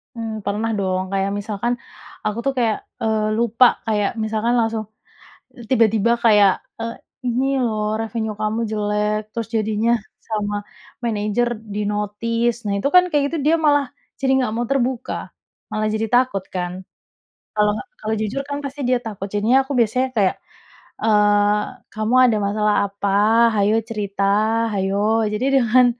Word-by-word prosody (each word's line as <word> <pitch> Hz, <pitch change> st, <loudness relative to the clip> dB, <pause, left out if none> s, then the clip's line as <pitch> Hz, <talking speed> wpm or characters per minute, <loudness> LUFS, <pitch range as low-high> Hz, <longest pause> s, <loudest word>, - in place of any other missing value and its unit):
Mmm, 220 Hz, -2 st, -5 dB
pernah 210 Hz, +3 st, -1 dB
dong 185 Hz, -1 st, 0 dB
kayak 195 Hz, 0 st, 0 dB
misalkan, 215 Hz, +3 st, -2 dB, 0.5 s
aku 215 Hz, +1 st, -1 dB
tuh 275 Hz, -, +1 dB
kayak, 225 Hz, -3 st, +2 dB, 0.2 s
eee, 215 Hz, -1 st, +1 dB
lupa, 235 Hz, +2 st, +4 dB, 0.2 s
kayak 210 Hz, -2 st, +1 dB
misalkan 220 Hz, +2 st, 0 dB
langsung, 225 Hz, -1 st, 0 dB, 0.9 s
tiba-tiba 225 Hz, -2 st, +3 dB
kayak, 205 Hz, -3 st, +6 dB, 0.3 s
"Eee, 230 Hz, 0 st, -4 dB, 0.3 s
ini 250 Hz, +2 st, +1 dB, 0.2 s
loh 215 Hz, -1 st, -1 dB
revenue 220 Hz, -1 st, -3 dB
kamu 215 Hz, +2 st, 0 dB
jelek, 210 Hz, 0 st, 0 dB
terus 230 Hz, -2 st, -4 dB
jadinya, 220 Hz, +1 st, +1 dB, 0.4 s
sama 210 Hz, -2 st, -2 dB, 0.5 s
manager 215 Hz, +1 st, 0 dB, 0.3 s
di-notice. 210 Hz, +3 st, -1 dB
"Nah, 200 Hz, -, 0 dB
itu 240 Hz, -, 0 dB
kan 360 Hz, -, +9 dB
kayak 295 Hz, -3 st, +2 dB
gitu 330 Hz, -, -1 dB
dia 325 Hz, -, +5 dB
malah 290 Hz, -1 st, +4 dB, 0.3 s
jadi 265 Hz, -1 st, +1 dB
nggak 250 Hz, -4 st, 0 dB
mau 240 Hz, +1 st, -1 dB
terbuka, 255 Hz, -2 st, -2 dB, 0.4 s
malah 215 Hz, 0 st, 0 dB
jadi 220 Hz, +1 st, 0 dB
takut 245 Hz, -6 st, +2 dB
kan? 180 Hz, +1 st, -3 dB, 0.7 s
Kalau 210 Hz, 0 st, +3 dB, 0.3 s
kalau 220 Hz, +1 st, -2 dB
jujur 230 Hz, +6 st, -2 dB
kan 285 Hz, -, -2 dB
pasti 280 Hz, +1 st, -6 dB
dia 255 Hz, -, +3 dB
takut, 200 Hz, -2 st, -5 dB
jadinya 220 Hz, +6 st, +3 dB
aku 280 Hz, -, -4 dB
biasanya 250 Hz, +4 st, +2 dB
kayak, 195 Hz, -3 st, +2 dB, 0.7 s
eee, 210 Hz, -1 st, +3 dB, 0.3 s
"Kamu 220 Hz, +3 st, 0 dB
ada 230 Hz, -4 st, +3 dB
masalah 210 Hz, 0 st, +1 dB
apa? 200 Hz, 0 st, -3 dB, 0.5 s
hayo 205 Hz, +2 st, +3 dB
cerita, 200 Hz, -3 st, -3 dB, 0.5 s
hayo." 205 Hz, +3 st, +1 dB
Jadi 230 Hz, +5 st, -1 dB
dengan 250 Hz, +1 st, +5 dB
215 Hz, 145 wpm, -21 LUFS, 205-235 Hz, 0.9 s, kan